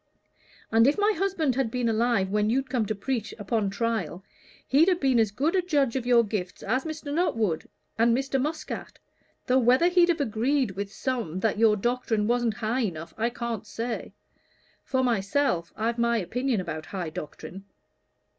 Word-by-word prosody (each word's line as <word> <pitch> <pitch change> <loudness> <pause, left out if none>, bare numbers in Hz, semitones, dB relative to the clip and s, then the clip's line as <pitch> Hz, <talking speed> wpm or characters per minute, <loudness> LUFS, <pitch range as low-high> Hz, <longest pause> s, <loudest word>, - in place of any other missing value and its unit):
"And 225 +2 +5
if 285 - +3
my 415 +1 +3
husband 345 -7 0
had 260 -2 0
been 245 0 -1
alive 225 -3 +1
when 210 0 +1
you'd 260 +2 0
come 235 -5 0
to 215 - -1
preach 220 0 -3
upon 205 0 -1
trial, 220 -3 -2 0.4
he'd 295 +6 +4
have 360 -2 +3
been 265 -3 +3
as 220 -2 +3
good 285 - 0
a 370 - +3
judge 285 -8 +1
of 250 -2 -2
your 240 -1 +6
gifts 200 -4 -4
as 255 +8 0
Mr. 315 -2 -5
Nuttwood 225 - 0 0.3
or 230 - +5
Mr. 265 +3 +1
Muscat, 305 +2 -4 0.5
though 255 +1 +3
whether 255 +8 +4
he'd 355 -1 +4
have 340 -2 +2
agreed 255 0 +1
with 200 +1 -5
some 220 - -3
that 215 0 0
your 225 -2 +5
doctrine 230 -1 0
wasn't 240 -1 +1
high 235 +2 -1
enough, 165 -7 -4
I 230 +2 0
can't 235 -3 -5
say. 230 +2 -4 0.7
For 260 -1 0
myself, 200 -5 0
I've 230 +2 -1
my 235 0 +2
opinion 245 +4 -1
about 155 -3 -6
high 180 -5 -4
doctrine." 180 +5 -8
235 Hz, 175 wpm, -26 LUFS, 210-270 Hz, 0.7 s, your